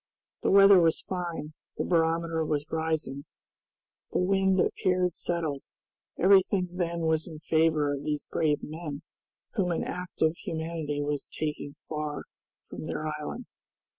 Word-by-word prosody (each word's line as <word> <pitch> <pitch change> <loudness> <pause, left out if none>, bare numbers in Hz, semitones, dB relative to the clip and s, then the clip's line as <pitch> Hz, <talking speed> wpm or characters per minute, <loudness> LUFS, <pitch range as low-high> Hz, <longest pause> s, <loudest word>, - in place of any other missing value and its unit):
The - - +1
weather 195 -1 +8
was 165 -2 +3
fine, 170 -4 -4 0.2
the - - 0
barometer 165 -1 +1
was 150 -2 -1
rising, 160 -3 -2 0.9
the - - 0
wind 190 +1 +3
appeared 180 -1 +1
settled, 160 -5 -2 0.6
everything 190 0 +4
then 170 -1 -2
was 160 -1 +1
in 160 -3 -8
favor 155 -2 +2
of 140 0 -4
these 150 -1 -2
brave 155 -3 0
men 155 -1 -6 0.5
whom 195 -6 +1
an 170 - 0
act 180 -2 -4
of 160 +1 +3
humanity 160 -3 -3
was 145 -1 -2
taking 150 -2 -4
far 150 -1 -3 0.4
from - - -7
their 155 - -3
island. 235 +11 -5
160 Hz, 135 wpm, -28 LUFS, 150-180 Hz, 0.9 s, weather